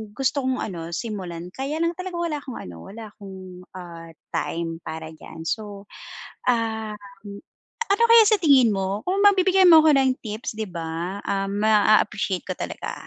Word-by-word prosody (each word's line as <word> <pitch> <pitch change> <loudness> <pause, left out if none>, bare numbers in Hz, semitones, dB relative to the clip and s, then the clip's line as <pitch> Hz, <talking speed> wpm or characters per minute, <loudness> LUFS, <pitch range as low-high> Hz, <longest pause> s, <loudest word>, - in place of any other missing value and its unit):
gusto 270 +1 0
kong 260 0 0
ano 170 -4 -6
simulan 180 -6 -6
kaya 275 +3 -3
lang 335 +1 0
talaga 365 -1 -6
wala 335 -3 -2
akong 260 -4 -8
ano, 90 - -9
wala 225 +3 -9
akong, 195 -2 -11 0.4
ah, 170 -2 -9 0.2
time 165 0 -3
para 160 0 -6
diyan, 160 +1 -11
so, 205 -1 -4 0.7
um, 220 -3 0 0.9
ano 400 +3 +2
kaya 460 -1 +9
sa 430 - +5
tingin 270 -8 +5
mo 195 +1 -2
kung 385 +2 0
mabibigyan 380 -2 +5
mo 320 - +10
ako 300 -3 +5
ng 265 -1 +3
tips 215 0 -5
'di 215 -2 -4
ba, 170 +3 -4
ah, 195 0 -1
ma-appreciate 210 -1 +2
ko - - -2
talaga. - - -5
215 Hz, 160 wpm, -23 LUFS, 185-280 Hz, 0.9 s, mo